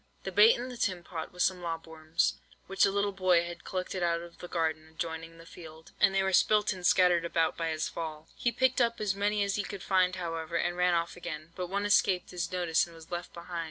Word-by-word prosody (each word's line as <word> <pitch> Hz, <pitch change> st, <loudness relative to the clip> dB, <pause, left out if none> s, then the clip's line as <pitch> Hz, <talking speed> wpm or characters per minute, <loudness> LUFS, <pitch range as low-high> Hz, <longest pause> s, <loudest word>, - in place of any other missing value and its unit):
"The 190 Hz, -, -4 dB
bait 210 Hz, +4 st, +7 dB
in 245 Hz, +2 st, -5 dB
the 250 Hz, -, -8 dB
tin 185 Hz, -6 st, -1 dB
pot 165 Hz, -2 st, -6 dB
was 180 Hz, 0 st, 0 dB
some 185 Hz, -1 st, +1 dB
lob 165 Hz, -1 st, -4 dB
worms, 160 Hz, 0 st, -1 dB, 0.3 s
which 195 Hz, 0 st, +3 dB
the -, -, +3 dB
little 200 Hz, 0 st, 0 dB
boy 185 Hz, -3 st, +3 dB
had 175 Hz, 0 st, -8 dB
collected 185 Hz, 0 st, -4 dB
out 170 Hz, -1 st, +1 dB
of 170 Hz, 0 st, -12 dB
the 175 Hz, -, -7 dB
garden 160 Hz, -2 st, -1 dB
adjoining 165 Hz, 0 st, -6 dB
the 165 Hz, -, -13 dB
field, 160 Hz, -2 st, -12 dB
and 195 Hz, -, +4 dB
they 195 Hz, -, +3 dB
were 190 Hz, 0 st, 0 dB
spilt 210 Hz, +2 st, +4 dB
and 185 Hz, -1 st, -10 dB
scattered 175 Hz, -1 st, +4 dB
about 165 Hz, -1 st, +1 dB
by 165 Hz, -1 st, -2 dB
his 155 Hz, -1 st, -1 dB
fall. 160 Hz, -2 st, -6 dB
"He 240 Hz, -, 0 dB
picked 255 Hz, +2 st, +2 dB
up 235 Hz, -1 st, +1 dB
as 210 Hz, -3 st, 0 dB
many 205 Hz, +1 st, +1 dB
as 200 Hz, 0 st, -1 dB
he 205 Hz, -, 0 dB
could 200 Hz, -2 st, -7 dB
find, 185 Hz, -1 st, +2 dB
however, 165 Hz, -2 st, -4 dB
and 175 Hz, +1 st, 0 dB
ran 180 Hz, 0 st, +3 dB
off 170 Hz, 0 st, -1 dB
again; 165 Hz, -2 st, -7 dB
but 180 Hz, -1 st, -4 dB
one 200 Hz, +2 st, -1 dB
escaped 195 Hz, -3 st, +2 dB
his 175 Hz, -2 st, -3 dB
notice 175 Hz, -2 st, +1 dB
and 170 Hz, -, -14 dB
was 165 Hz, +1 st, -14 dB
left 175 Hz, 0 st, -4 dB
behind. 170 Hz, 0 st, -7 dB
175 Hz, 245 wpm, -30 LUFS, 165-195 Hz, 0.3 s, bait